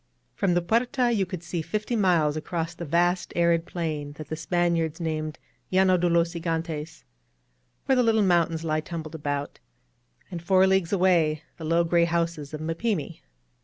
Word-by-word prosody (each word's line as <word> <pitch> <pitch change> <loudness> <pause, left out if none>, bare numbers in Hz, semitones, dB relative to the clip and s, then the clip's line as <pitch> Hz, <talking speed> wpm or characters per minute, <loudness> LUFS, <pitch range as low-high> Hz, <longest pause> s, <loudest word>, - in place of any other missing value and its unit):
From 185 -3 +1
the 175 - +1
Puerta 240 +5 +1
you 200 -5 +1
could 180 -2 -6
see 170 -1 -3
fifty 210 +8 -2
miles 170 -8 +2
across 165 +1 -3
the 170 0 -7
vast 175 +4 +1
arid 170 -1 +2
plain 155 -4 -4
that 155 0 -10
the 155 - -2
Spaniards 165 -1 0
named 155 -2 -3 0.3
Llano 185 0 +4
de 175 0 +1
los 170 0 +2
Gigantes^ 165 - -4 0.8
where 265 - +3
the 250 - +4
little 225 -2 +3
moun^ 175 -3 +3
tains 165 -1 -5
lie 155 -1 0
tumbled 160 -1 -7
about; 145 -2 -4 0.7
and 175 -2 -5
four 190 +2 +4
leagues 190 -3 +2
away 170 -5 +2
the 160 - -7
low 165 +2 +3
gray 170 0 +3
houses 170 -3 -2
of 155 - -5
Mapimi. 165 0 -2
170 Hz, 170 wpm, -26 LUFS, 160-185 Hz, 0.8 s, Llano